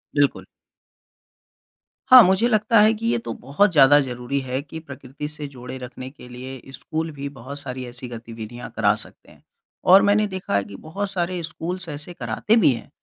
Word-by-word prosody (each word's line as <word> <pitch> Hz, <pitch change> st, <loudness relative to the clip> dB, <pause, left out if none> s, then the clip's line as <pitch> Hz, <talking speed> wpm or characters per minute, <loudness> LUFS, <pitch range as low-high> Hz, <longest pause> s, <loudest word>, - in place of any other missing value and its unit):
बिल्कुल। 145 Hz, -1 st, +1 dB, 1.6 s
हाँ, 255 Hz, -1 st, +11 dB
मुझे 190 Hz, +5 st, +3 dB
लगता 215 Hz, -1 st, +3 dB
है 215 Hz, +1 st, +5 dB
कि 225 Hz, +1 st, -6 dB
ये 235 Hz, -, +2 dB
तो -, -, -3 dB
बहुत 190 Hz, +9 st, +1 dB
ज़्यादा 145 Hz, -2 st, +7 dB
ज़रूरी 125 Hz, +1 st, -3 dB
है 130 Hz, +1 st, -3 dB
कि 155 Hz, +3 st, -9 dB
प्रकृति 140 Hz, -1 st, -8 dB
से 150 Hz, -1 st, -7 dB
जोड़े 130 Hz, -1 st, -9 dB
रखने 130 Hz, 0 st, -8 dB
के 130 Hz, -2 st, -14 dB
लिए 130 Hz, +1 st, -9 dB
स्कूल 160 Hz, +3 st, -4 dB
भी 140 Hz, -1 st, -6 dB
बहुत 140 Hz, +1 st, -9 dB
सारी 130 Hz, -2 st, -6 dB
ऐसी 125 Hz, +1 st, -8 dB
गतिविधियाँ 115 Hz, 0 st, -8 dB
करा -, -, +3 dB
सकते -, -, -11 dB
हैं, -, -, -21 dB, 0.4 s
और 190 Hz, +2 st, +7 dB
मैंने 205 Hz, +1 st, +3 dB
देखा 190 Hz, -, -4 dB
है 100 Hz, -, +2 dB
कि 100 Hz, 0 st, -11 dB
बहुत 195 Hz, -, -5 dB
सारे 180 Hz, -1 st, -2 dB
स्कूल्स 175 Hz, +3 st, -5 dB
ऐसे 150 Hz, +4 st, -7 dB
कराते 125 Hz, -, 0 dB
भी 225 Hz, -11 st, +5 dB
हैं। 115 Hz, -, -9 dB
145 Hz, 185 wpm, -23 LUFS, 125-185 Hz, 1.6 s, हाँ